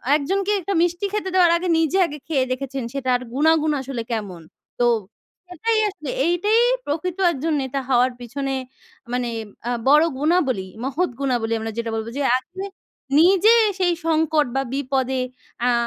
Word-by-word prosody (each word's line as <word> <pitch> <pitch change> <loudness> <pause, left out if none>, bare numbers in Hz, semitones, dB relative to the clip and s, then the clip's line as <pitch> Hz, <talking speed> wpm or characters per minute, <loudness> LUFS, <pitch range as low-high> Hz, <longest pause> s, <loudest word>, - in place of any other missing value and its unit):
একজনকে 385 +7 0
একটা 395 +3 -2
মিষ্টি 350 +3 0
খেতে 420 -3 -2
দেওয়ার 360 -2 +5
আগে 360 +2 -3
নিজে 325 +3 +1
আগে 300 -2 -6
খেয়ে 275 -5 +1
দেখেছেন, 270 0 -3
সেটার 255 -2 0
গুণাগুণ 310 +2 +3
আসলে 265 -2 -5
কেমন? 200 -7 -4 0.4
তো 245 - +3 0.6
সেটাই 435 +6 0
আসলে 345 -8 -8 0.2
এইটাই 355 +7 +2 0.3
প্রকৃত 330 +5 -3
একজন 315 +1 -2
নেতা 265 +1 -3
হওয়ার 250 0 +3
পিছনে 270 +3 -4 0.6
মানে 250 -1 -1 0.4
আ - - 0 0.2
বড় 300 +3 +7 0.2
গুণাবলী, 285 - +1 0.2
মহৎ 300 +7 0
গুণাবলী। 245 -5 0
আমরা 225 0 -4
যেটা 230 0 -2
বলবো 220 +1 -4
যে - - -1 0.2
আগে 365 +8 -8 0.6
নিজে 385 +6 +6 0.3
সেই 355 -2 +3
সংকট 315 -2 +2
বা, 270 - +2
বিপদে 265 -1 -1 0.4
অ্যা 245 +1 +3
290 Hz, 150 wpm, -22 LUFS, 255-350 Hz, 0.6 s, বড়